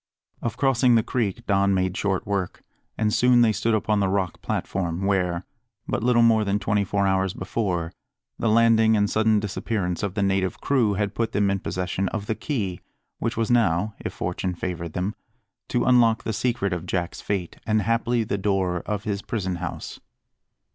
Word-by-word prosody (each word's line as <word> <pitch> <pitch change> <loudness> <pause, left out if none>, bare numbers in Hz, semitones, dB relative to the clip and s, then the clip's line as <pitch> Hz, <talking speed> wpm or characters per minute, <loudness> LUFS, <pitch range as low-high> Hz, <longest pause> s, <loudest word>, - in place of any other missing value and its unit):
Of 115 -1 -3
crossing 125 -2 +3
the 115 - +4
creek 115 -1 -2
Don 100 -1 +2
made 95 0 0
short 95 -2 -1
work, 100 -3 -3 0.3
and 105 -1 +1
soon 125 0 +5
they 115 -2 +5
stood 110 +2 +1
upon 105 0 +1
the 100 - +2
rock 95 -3 -1
platform, 90 0 -2
where, 90 -3 0 0.4
but - - -1
little 120 0 +4
more 115 -2 +4
than 100 0 +1
twenty 105 0 +1
four 100 +1 0
hours 95 -1 +1
before, 90 -4 -2 0.5
the 115 - +1
landing 110 0 +5
and 105 0 +3
sudden 110 0 +2
disappearance 100 -3 -2
of 100 -3 -3
the 100 - +1
native 95 -1 0
crew 120 -8 +2
had 100 0 -1
put 115 -1 -2
them 100 -1 +2
in 95 - 0
possession 95 +1 -2
of 105 -2 -4
the 110 - -1
key 110 - -3 0.4
which 115 0 -2
was 115 0 0
now, 105 -3 +2
if - - -4
fortune 90 +1 -3
favoured 85 -2 -4
them, 95 +4 -2 0.5
to 120 - 0
unlock 120 -3 +4
the 110 - -2
secret 115 -3 0
of 90 0 -5
Jack's 90 -1 -2
fate, 95 -4 -3
and, 110 -1 +2
haply, 115 +2 +1
the 100 -2 -2
door 95 -3 0
of 105 -1 -2
his 105 -2 -2
prison 95 -6 -3
house. - - -6
100 Hz, 185 wpm, -24 LUFS, 95-115 Hz, 0.5 s, soon